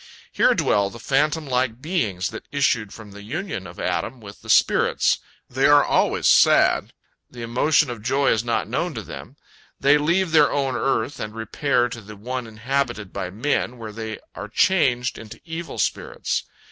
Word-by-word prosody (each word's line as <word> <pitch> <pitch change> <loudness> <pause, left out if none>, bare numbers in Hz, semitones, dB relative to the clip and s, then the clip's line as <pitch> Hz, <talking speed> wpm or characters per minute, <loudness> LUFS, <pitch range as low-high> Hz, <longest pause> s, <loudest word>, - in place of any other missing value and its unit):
Here - - +3
dwell 100 -1 +2
the 115 - -11
phantom 150 +6 0
like 125 -3 -1
beings 115 - -1
that 110 - -9
issued 125 -7 +1
from 105 -3 -11
the 100 +1 -11
union 120 - -5
of 85 - -12
Adam 125 +2 -2
with 100 -2 -12
the - - -13
spirits. - - +3 0.3
They 135 +2 +2
are 145 0 +6
always - - +1
sad; - - +5 0.4
the 120 -1 -9
emotion 125 +4 +2
of 115 -3 -7
joy 135 +5 +2
is 110 - +1
not 115 -3 -1
known 155 +7 -2
to 110 - -5
them. - - -10 0.4
They 145 +2 +4
leave 170 +4 +1
their 155 -2 +5
own 135 -2 0
earth 135 +1 -1
and 110 +1 -6
repair 125 +2 0
to 115 0 -7
the 105 +1 -11
one 125 +4 -5
inhabited 115 -2 -3
by 95 -2 -4
men, 120 +4 -1
where 110 -2 -7
they 110 0 -6 0.2
are - - -7
changed 130 - +2
into 110 -1 -11
evil 165 0 -6
spirits. 480 0 -2
125 Hz, 175 wpm, -23 LUFS, 110-145 Hz, 0.4 s, are